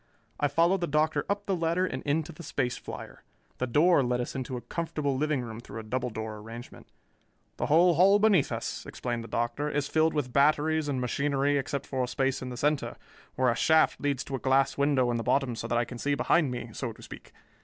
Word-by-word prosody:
I 145 - +3
followed 170 +6 +2
the 175 - 0
Doctor 150 -1 +1
up 200 0 -1
the 195 - 0
ladder 170 +2 +1
and 130 -7 -4
into 155 +3 0
the 170 - -11
space 130 -6 -2
flier. - - -9 0.4
The 125 - -1
door 150 +6 +4
led 125 -1 0
us 120 - -3
into 130 -1 -4
a - - -6
comfortable 150 -4 -2
living 150 0 0
room 115 -1 -7
through 120 - -8
a - - -7
double 125 +3 -2
door 110 -1 -5
arrangement. 115 +3 -10 0.7
"The - - -1
whole 170 +4 +5
hull 190 +5 +6
beneath 205 -8 +3
us," - - -4
explained 120 -2 -4
the - - -9
Doctor, 120 +7 -1
"is 145 -1 -1
filled 160 0 +2
with 130 -5 -2
batteries 150 +2 +3
and 135 -3 -1
machinery 140 +3 0
except 140 0 -2
for 130 -2 -2
a - - -9
space 135 +1 -1
in 130 - -5
the 125 - -7
center, 150 +3 0 0.4
where 130 -1 +3
a - - -1
shaft 160 +4 +3
leads 140 -2 0
to 135 - -5
a - - -4
glass 135 +1 +2
window 140 -3 +2
in 120 - 0
the 115 - -3
bottom 130 0 +1
so - - -5
that 120 - 0
I 120 - +1
can 120 +1 -9
see 145 +2 0
behind 150 +1 +2
me, 120 -2 -5
so 120 0 -4
to - - -16
speak. - - -11
140 Hz, 230 wpm, -28 LUFS, 125-155 Hz, 0.7 s, hull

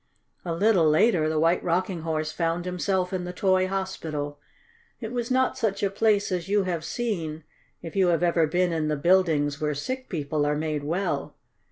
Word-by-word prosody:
A 175 - -4
little 180 -2 +3
later 155 0 +3
the 155 - -1
White 165 +3 +2
Rocking 180 0 -1
Horse 155 -1 -2
found 170 +1 -1
himself 180 +1 -1
in 185 -1 -2
the 180 - -5
toy 185 0 +2
hospital. 160 -7 -4 0.6
It 225 -2 -6
was 240 -1 -3
not 260 0 +1
such 210 -5 -1
a 195 - +1
place 205 -1 +2
as 180 0 -2
you 205 0 +3
have 175 -3 -2
seen 165 -6 -3 0.4
if 165 - -8
you 190 -2 +3
have 175 0 +2
ever 170 -2 +3
been 175 +2 +1
in 160 -2 -1
the 155 - 0
buildings 155 -3 +2
where 150 -1 0
sick 255 - -4
people 150 -3 -1
are 145 0 +1
made 155 -1 -2
well. 175 +7 -2
175 Hz, 190 wpm, -26 LUFS, 155-195 Hz, 0.6 s, little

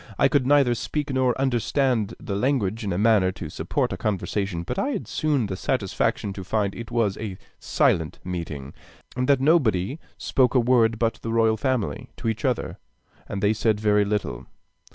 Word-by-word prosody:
I - - +5
could 130 -3 +2
neither 140 -3 +4
speak 145 +4 -3
nor 130 -1 +1
understand 125 -3 +1
the 100 - -4
language 115 -2 0
in 100 - -2
a 90 - -1
manner 105 -3 +4
to 90 - -7
support - - -1
a - - -4
conversation, 100 -3 -2
but 125 +8 -3
I 275 - 0
had 285 - -3
soon 150 -6 0
the 100 -2 -4
satisfaction 100 +1 -1
to 95 -1 -7
find 100 0 0
it 115 -2 -8
was 115 -4 0
a 100 -4 -5 0.2
silent 80 -3 +1
meeting, 80 -6 -5 0.4
and 125 +1 -1
that 140 -2 +5
nobody 135 - +2 0.2
spoke 130 0 +1
a - - +6
word 115 -2 +3
but 115 0 0
the 115 - -4
royal 115 -1 +3
family 110 - -2
to - - -4
each 110 0 -2
other, 125 -3 -1 0.5
and 100 0 -4
they 105 +1 +4
said 110 -1 +1
very 105 -1 +3
little. 100 - -3
110 Hz, 185 wpm, -24 LUFS, 100-130 Hz, 0.5 s, a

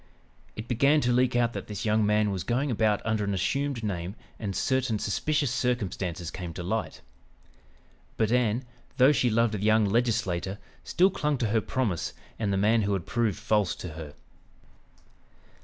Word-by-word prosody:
It 110 +2 -7
began 140 +6 +3
to 125 - +1
leak 125 0 +2
out 120 -1 +2
that - - -6
this 105 -1 -5
young 110 0 +3
man 105 0 +2
was 95 -3 -3
going 125 +7 0
about 110 -2 +1
under 110 -1 0
an 100 -1 -1
assumed 135 +6 -1
name 95 -2 -3 0.2
and 100 -3 -4
certain 130 -2 +1
suspicious 145 +7 0
circumstances 100 -9 -2
came 85 -3 -6
to 90 - -5
light. 110 +5 -3 1.2
But 110 -1 +1
Ann, 120 0 +2 0.3
though 130 +3 +6
she 125 -4 +2
loved 115 0 +2
the 105 - -2
young 110 +1 +4
legislator, 100 -4 0 0.3
still 185 +2 +3
clung 150 -5 0
to 115 -4 -1
her 110 +1 +2
promise 105 -11 -2 0.3
and 105 -3 0
the 95 - +1
man 110 +3 +3
who 100 -1 0
had 95 -4 -2
proved 115 -5 0
false 105 -3 +1
to 90 - -7
her. 80 -2 -9
110 Hz, 175 wpm, -27 LUFS, 100-125 Hz, 1.2 s, though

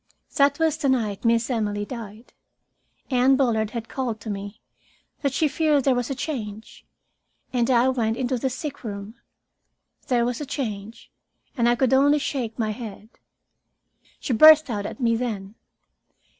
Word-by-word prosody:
That 280 0 +4
was 320 -2 +1
the 295 -4 0
night 220 -6 0
Miss 230 0 +2
Emily 205 -3 -1
died. 225 -1 -9 0.8
Anne 255 +1 +4
Bullard 230 -5 +1
had 230 0 -6
called 245 -5 -3
to 220 - -5
me 200 +2 -7 0.6
that 280 -3 0
she 310 +4 +1
feared 300 -2 +1
there 270 - +3
was 245 0 -2
a 275 - -2
change, 220 -7 -6 0.7
and 240 -1 +1
I 245 0 +4
went 230 -3 0
into 255 -1 -1
the 265 - 0
sickroom. 230 -7 -6 0.9
There 240 -3 +2
was 245 +3 -3
a - - -3
change, 225 -5 -5 0.4
and 235 -3 +2
I 240 - +3
could 260 +1 +1
only 285 +2 +5
shake 255 -6 -3
my 220 -3 -1
head. 215 -1 -8 1.1
She 260 - -2
burst 310 +3 +7
out 205 -2 -3
at - - -9
me 230 -2 +2
then. 215 -5 -4
240 Hz, 155 wpm, -24 LUFS, 220-270 Hz, 1.1 s, burst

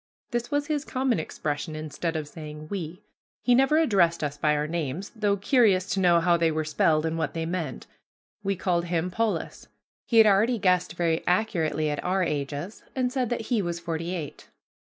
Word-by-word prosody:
This 240 0 -2
was 290 0 0
his 295 -1 -1
common 255 - 0
expression 155 0 -4
instead 155 +2 -4
of 155 -2 -3
saying 150 0 -9
"we." 180 0 -5 0.4
He 245 - +4
never 270 +5 +4
addressed 190 - +3
us 145 -1 -2
by 150 +1 +1
our 150 0 0
names, 165 +3 -3
though 205 -2 +1
curious 200 -3 +3
to 195 - 0
know 175 -2 +5
how 170 0 +3
they 165 -1 +2
were 155 0 -1
spelled 155 +1 +2
and 165 0 -1
what 160 -1 -2
they 165 0 -2
meant. 165 -6 -4 0.6
We 195 0 0
called 175 -1 0
him 175 +1 -1
Polis. 225 +3 -2 0.4
He 230 - +2
had 225 - +9
already 215 +4 +4
guessed 180 -4 +1
very 170 -2 0
accurately 165 -6 +1
at 145 - -3
our 185 +1 +1
ages, 150 +4 -3
and 250 -1 0
said 255 -4 0
that 240 - -1
he 230 -4 +3
was 170 -2 -3
forty 170 +1 -3
eight. 155 -5 -7
175 Hz, 195 wpm, -26 LUFS, 155-210 Hz, 0.6 s, had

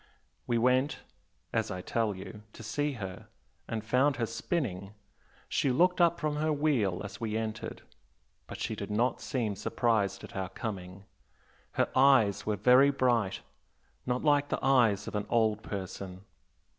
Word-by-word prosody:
We 120 - +1
went 130 +4 +2 0.6
as 110 -1 0
I 90 -2 -4
tell 110 0 -1
you 95 +3 -9
to 115 - -11
see 145 +7 -1
her, 95 -6 -7 0.4
and 110 -2 -3
found 130 +5 +3
her 120 - 0
spinning. 115 - -3 0.5
She 140 - +1
looked 180 +7 +3
up 170 0 +4
from 150 -2 -1
her 155 +1 +1
wheel 140 -12 +1
as 100 +4 -8
we 110 -1 -1
entered 110 -1 -5 0.6
but - - -8
she 110 - -2
did 100 0 -6
not 115 +4 0
seem 115 -7 -2
surprised 110 0 0
at - - -10
our 95 -1 -3
coming. 95 -2 -6 0.7
Her - - +2
eyes 130 -8 +4
were 105 - +1
very 125 +7 +6
bright 120 -7 +1 0.7
not 125 0 0
like 145 -1 +3
the - - -2
eyes 115 -7 +3
of - - -5
an 105 -1 -2
old 110 -2 +2
person. 95 -2 -6
115 Hz, 155 wpm, -30 LUFS, 100-135 Hz, 0.7 s, very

